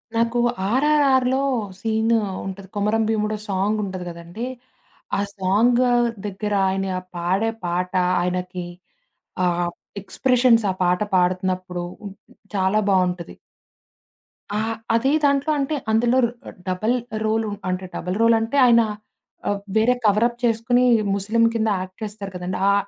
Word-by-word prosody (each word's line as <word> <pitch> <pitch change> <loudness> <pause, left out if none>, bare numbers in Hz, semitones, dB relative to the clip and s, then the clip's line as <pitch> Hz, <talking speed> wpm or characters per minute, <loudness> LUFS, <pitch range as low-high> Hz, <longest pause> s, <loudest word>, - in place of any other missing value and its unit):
నాకు 230 +1 +1 0.3
'ఆర్ఆర్ఆర్‌లో' 265 +1 +3 0.4
సీను 225 +2 +1 0.3
ఉంటది. 195 0 -7
'కొమరం 210 +2 +1
భీముడో' 215 -1 0
సాంగుంటది 195 -1 -1
గదండీ! 170 +7 -7 0.7
ఆ - - 0 0.2
సాంగ్ 220 +7 +3 0.4
దగ్గర 205 +1 -3 0.2
ఆయన 195 0 -1 0.3
పాడే 185 +6 0 0.2
పాట 180 +1 -1 0.3
ఆయనకి 180 0 -3 0.8
ఆహ్, 175 0 +1 0.3
ఎక్స్‌ప్రెషన్స్ 245 +2 +3
ఆ - - -3
పాట 180 +1 +2
పాడుతున్నప్పుడు, 185 0 0 0.7
చాలా 190 +2 +2
బావుంటది. 180 -2 0 1.2
ఆ! - - +1 0.4
అదే 255 +4 +2
దాంట్లో 280 +1 +2
అంటే 280 +2 -1 0.2
అందులో 235 +3 +3
ర - - -1 0.4
డబుల్ 200 +6 0 0.3
రోలు 220 0 0 0.2
అంటే, 185 +1 -2
డబల్ 180 +3 -3
రోల్ 230 0 +5
అంటే, 225 +5 -2
ఆయన 235 -1 +6 0.7
ఆహ్ 205 0 0 0.2
వేరే 235 +3 +4
కవరప్ 230 +3 +3
చేసుకొని 240 +2 +2 0.3
ముస్లిం 215 +4 +1
కింద 225 -1 0
యాక్ట్ 185 0 -8
చేస్తారు 205 -2 -6
కదండీ! 180 +1 -4
ఆ! - - +4
210 Hz, 120 wpm, -22 LUFS, 185-230 Hz, 1.2 s, ఆయన